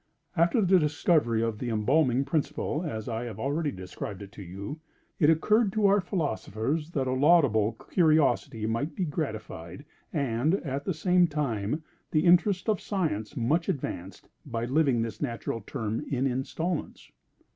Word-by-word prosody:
After 170 +6 +3
the 185 0 +5
discovery 150 -6 +2
of 115 -2 -2
the 125 - -3
embalming 125 +4 +2
principle, 155 0 -1
as 110 -11 -4
I 115 0 -3
have 110 -3 -7
already 145 +5 0
described 95 -1 -7
it 100 - -11
to 110 - -11
you, 100 - -7 0.4
it 150 - +5
occurred 210 +7 +3
to 215 -1 +2
our 200 0 +5
philosophers 150 - -2
that 135 -2 0
a 130 - -1
laudable 130 -7 +4
curiosity 150 - +2
might 115 +8 -2
be 185 - -1
gratified, 110 - -5 0.3
and, 140 +2 +1
at 140 0 -3
the 190 - 0
same 180 +2 +3
time, 145 -2 -2 0.3
the 155 - +2
interests 180 +3 +4
of 215 -3 +1
science 155 - -2
much 150 +8 +1
advanced, 95 - -4 0.2
by 115 -4 -3
living 130 -3 +2
this 110 -2 -6
natural 115 -4 -3
term 110 +2 -3
in 135 -1 0
installments. 145 +6 -3
140 Hz, 155 wpm, -28 LUFS, 115-165 Hz, 0.4 s, the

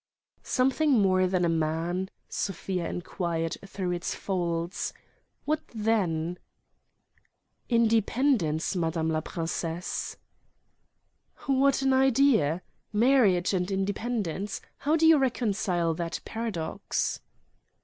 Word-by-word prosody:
"Something 270 +3 +2
more 185 -5 +4
than 180 -1 +1
a - - +2
man?" 165 +3 -1 0.2
Sofia 185 -2 -3
enquired 170 -2 -3
through 190 -2 -3
its 175 0 -2
folds. 170 -2 -2 0.5
"What 310 +1 0
then?" 180 -6 0 1.3
"Independence, 225 - +2
madame 165 -2 0
la 155 0 0
princesse." 165 +1 -3 1.3
"What 275 0 +3
an 270 0 +3
idea! 260 - +3 0.3
Marriage 210 -6 +4
and 180 0 0
independence: 200 -1 -2 0.2
how 300 +3 +1
do 325 0 +3
you 320 -2 +7
reconcile 200 -9 0
that 165 0 -3
paradox?" 220 -8 -2
190 Hz, 95 wpm, -28 LUFS, 170-240 Hz, 1.3 s, you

